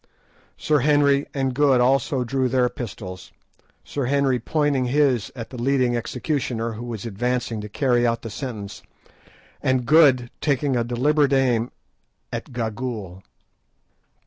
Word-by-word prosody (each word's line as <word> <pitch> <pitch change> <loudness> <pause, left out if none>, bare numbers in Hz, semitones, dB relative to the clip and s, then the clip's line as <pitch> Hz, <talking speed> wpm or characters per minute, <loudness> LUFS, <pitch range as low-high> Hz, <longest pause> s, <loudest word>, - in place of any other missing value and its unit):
Sir 150 -1 +2
Henry 145 -1 +3
and 135 -2 -1
Good 135 -1 +3
also 130 +1 +2
drew 130 +1 0
their 125 -1 +2
pistols, 95 -7 -8 0.5
Sir 140 -3 -3
Henry 135 -1 +1
pointing 145 0 0
his 130 -4 +1
at 115 -3 -7
the 125 -3 -6
leading 130 -1 +2
executioner, 125 -1 -2
who 115 +2 -7
was 115 -3 -6
advancing 115 +1 -2
to 105 - -7
carry 120 +1 +2
out 115 0 -1
the 115 - -6
sentence, 110 -6 -6 0.8
and 130 -2 +1
Good 135 -5 +5
taking 140 -2 +1
a 120 - +1
deliberate 140 +4 +2
aim 125 -3 +2 0.6
at - - -5
Gagool. 110 -5 -4
125 Hz, 135 wpm, -23 LUFS, 115-140 Hz, 0.8 s, Good